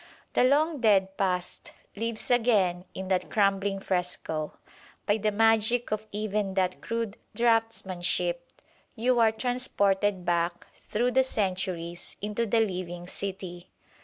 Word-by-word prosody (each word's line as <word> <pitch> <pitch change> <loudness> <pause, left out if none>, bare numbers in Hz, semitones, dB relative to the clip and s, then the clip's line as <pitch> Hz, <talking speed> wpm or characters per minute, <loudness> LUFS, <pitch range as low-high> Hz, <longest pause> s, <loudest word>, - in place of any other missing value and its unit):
The - - +4
long 295 +4 +3
dead 195 -4 +3
past 180 -2 -2 0.2
lives 230 +2 -1
again 200 -7 +3
in 190 0 -5
that 185 -1 0
crumbling 195 -1 +1
fresco. 180 -5 -2 0.5
By 205 - +2
the 215 0 +1
magic 225 +2 +2
of 215 0 -2
even 210 -2 -2
that 185 -1 0
crude 230 -3 -3 0.2
draughtsmanship 225 - +1 0.6
you 245 +1 +2
are 225 -1 +5
transported 205 -6 0
back 170 0 0
through 240 +3 -1
the 265 +1 +4
centuries 185 -7 -2
into 210 +3 -2
the 225 +2 +3
living 180 -4 -3
city. 185 -2 -6
205 Hz, 125 wpm, -28 LUFS, 185-230 Hz, 0.6 s, are